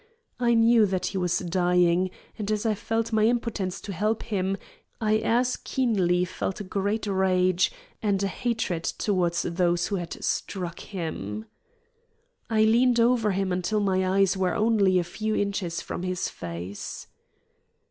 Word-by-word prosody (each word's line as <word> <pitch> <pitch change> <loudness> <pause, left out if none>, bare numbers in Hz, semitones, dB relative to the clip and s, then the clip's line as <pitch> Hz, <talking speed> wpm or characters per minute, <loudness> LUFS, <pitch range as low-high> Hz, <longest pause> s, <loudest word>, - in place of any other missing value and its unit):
I 240 -1 +3
knew 225 -1 +5
that 185 -1 -1
he 195 - -2
was 180 -1 +1
dying, 180 0 +2 0.3
and 210 -2 -4
as 215 +1 -1
I 220 - +3
felt 225 +2 -2
my 215 0 +4
impotence 225 -6 -1
to 200 - -6
help 210 +5 0
him, 195 -3 -1 0.4
I 215 -1 +2
as 245 +3 +1
keenly 185 -9 +1
felt 185 +2 -4
a - - -4
great 200 +3 -1
rage 185 -2 +2 0.3
and 200 -2 +1
a - - +2
hatred 215 -6 -2
toward 180 -4 0
those 175 0 +1
who 200 - 0
had 175 -2 -6
struck 180 -4 -2
him. 110 - -5 1.0
I 220 -1 +3
leaned 240 +2 +4
over 230 -2 +3
him 190 0 -1
until 180 +4 0
my 190 -1 +1
eyes 195 -1 +4
were 185 -2 0
only 210 -4 +3
a 180 - +2
few 215 +5 -3
inches 195 -4 -1
from - - -5
his 185 -1 -2
face. 90 +3 -7
195 Hz, 155 wpm, -26 LUFS, 180-220 Hz, 1.0 s, knew